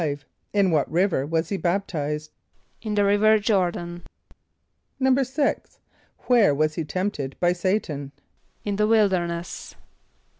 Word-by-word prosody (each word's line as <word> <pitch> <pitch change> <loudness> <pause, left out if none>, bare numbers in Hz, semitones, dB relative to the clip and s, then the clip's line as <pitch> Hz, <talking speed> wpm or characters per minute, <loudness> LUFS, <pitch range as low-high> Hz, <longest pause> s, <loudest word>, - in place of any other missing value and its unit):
= - - -50
In 200 -3 +3
what 150 -3 +1
river 170 -5 +1
was 165 +1 -1
he 200 - -1
baptized? 155 -5 -2 0.5
=In 215 -2 -3
the 205 -1 +3
river 210 +2 +4
Jôr´dan.= 175 -5 -1 1.0
=6.= 265 +2 0 0.4
Where 225 - +4
was 155 +1 +1
he 165 - -3
tempted 155 -5 -3
by 175 0 +3
S[=a]´tan? 175 -6 -1 0.6
=In 205 -1 -1
the 210 0 +2
wilderness. 185 -6 0
185 Hz, 120 wpm, -24 LUFS, 160-210 Hz, 1.0 s, river